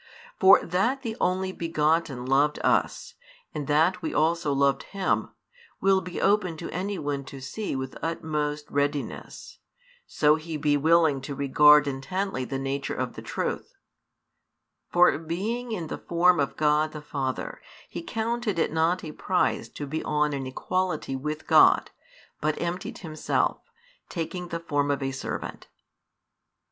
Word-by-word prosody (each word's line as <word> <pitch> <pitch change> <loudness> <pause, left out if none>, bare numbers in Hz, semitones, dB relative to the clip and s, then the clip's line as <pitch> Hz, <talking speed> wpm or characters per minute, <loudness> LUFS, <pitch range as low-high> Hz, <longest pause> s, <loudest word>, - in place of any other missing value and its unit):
For 190 0 +7
that 230 +10 0
the 225 -3 -3
Only 185 +1 +1
begotten 160 -6 0
loved 140 +3 +3
us, - - +1 0.4
and 145 -2 -4
that 160 +5 +3
we 160 - -3
also 160 -1 +2
loved 140 0 +2 0.2
Him, 190 - 0 0.5
will 195 0 +3
be 180 0 -6
open 195 -5 +2
to 170 - -6
any 195 +3 -3
one 145 -3 -3
to 135 - -9
see 135 +8 -4
with 130 0 -4
utmost 150 -2 -2
readiness, 145 0 -3 0.5
so 150 0 +3
he 160 0 -5
be 145 0 +2
willing 160 -1 +3
to 140 +1 -6
regard 150 +2 +6
intently 140 +2 -2
the 135 - -3
nature 135 +1 -3
of - - -3
the - - -8
truth: - - -4 1.2
For 175 -3 +5
being 210 +10 -3
in 180 -7 -3
the - - -6
form 175 0 +3
of 140 - -1
God 150 0 +2
the 150 - -7
Father, 135 -3 -4 0.3
He - - -6
counted 230 - -2
it 160 - 0
not 165 +3 +1
a 155 - -6
prize 180 +4 0
to 145 - -6
be 155 +3 -4
on 150 -1 +1
an 135 -2 -3
equality 180 +1 -2
with 150 +3 -4
God, - - +5 0.5
but 155 0 -1
emptied 175 +1 -3
Himself, 155 -3 -1 0.5
taking 175 +1 -4
the 170 -1 -4
form 145 -3 -1
of 140 -1 0
a 135 - -1
servant. 135 0 -6
155 Hz, 150 wpm, -26 LUFS, 145-180 Hz, 1.2 s, For